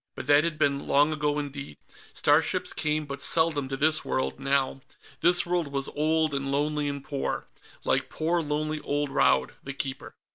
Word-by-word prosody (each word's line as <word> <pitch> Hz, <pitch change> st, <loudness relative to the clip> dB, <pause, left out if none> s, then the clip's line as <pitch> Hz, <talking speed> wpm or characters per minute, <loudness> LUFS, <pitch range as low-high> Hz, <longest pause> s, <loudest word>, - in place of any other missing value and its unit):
But -, -, -6 dB
that 145 Hz, +2 st, +5 dB
had 165 Hz, -2 st, -2 dB
been 140 Hz, -1 st, +1 dB
long 145 Hz, +2 st, +4 dB
ago 150 Hz, -1 st, 0 dB
indeed. 140 Hz, -, -5 dB, 0.3 s
Starships -, -, +2 dB
came 150 Hz, 0 st, -1 dB
but 140 Hz, -1 st, -5 dB
seldom 155 Hz, -5 st, +1 dB
to 135 Hz, -, -3 dB
this 155 Hz, +2 st, +3 dB
world, 65 Hz, -, -2 dB
now. 135 Hz, -1 st, +1 dB, 0.4 s
This 175 Hz, +1 st, +3 dB
world 175 Hz, -2 st, 0 dB
was 140 Hz, -1 st, -3 dB
old 155 Hz, 0 st, +1 dB
and 135 Hz, 0 st, -2 dB
lonely 150 Hz, +1 st, 0 dB
and 140 Hz, -1 st, -5 dB
poor. 140 Hz, -2 st, -3 dB, 0.4 s
Like -, -, +1 dB
poor 165 Hz, +2 st, 0 dB
lonely 155 Hz, 0 st, -2 dB
old 145 Hz, 0 st, -1 dB
Raud 140 Hz, -, +3 dB
the 140 Hz, -, -6 dB
Keeper. 135 Hz, -1 st, -5 dB
145 Hz, 175 wpm, -27 LUFS, 140-155 Hz, 0.4 s, that